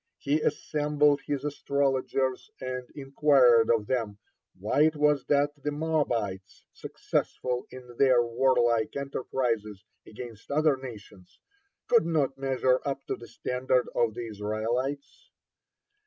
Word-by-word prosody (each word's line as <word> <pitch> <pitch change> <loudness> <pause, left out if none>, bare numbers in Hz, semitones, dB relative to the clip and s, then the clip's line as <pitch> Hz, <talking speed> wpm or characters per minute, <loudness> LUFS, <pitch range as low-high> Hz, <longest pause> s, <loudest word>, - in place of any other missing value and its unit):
He 145 +2 0
assembled 150 -1 +1
his 145 -1 -2
astrologers 135 -2 -1
and 125 -1 -5
inquired 135 -4 +4
of 115 -3 +2
them, 115 -4 -2 0.4
why 110 +10 +2
it 160 0 +1
was 150 -2 +2
that 145 0 +2
the 150 - -2
Moabites, 145 -11 -2
successful 125 -1 -3
in 125 -1 -12
their 130 -3 +5
warlike 120 -1 +1
enterprises 120 -7 -3 0.2
against 115 -1 -10
other 150 0 +3
nations, 105 -8 -12 0.5
could 475 -2 +3
not 145 -5 +1
measure 130 -1 +1
up 135 -1 -4
to - - -2
the 120 - -12
standard 125 +1 -1
of 115 -2 +1
the 120 -1 -5
Israelites. 120 - -4
130 Hz, 120 wpm, -28 LUFS, 120-145 Hz, 0.5 s, their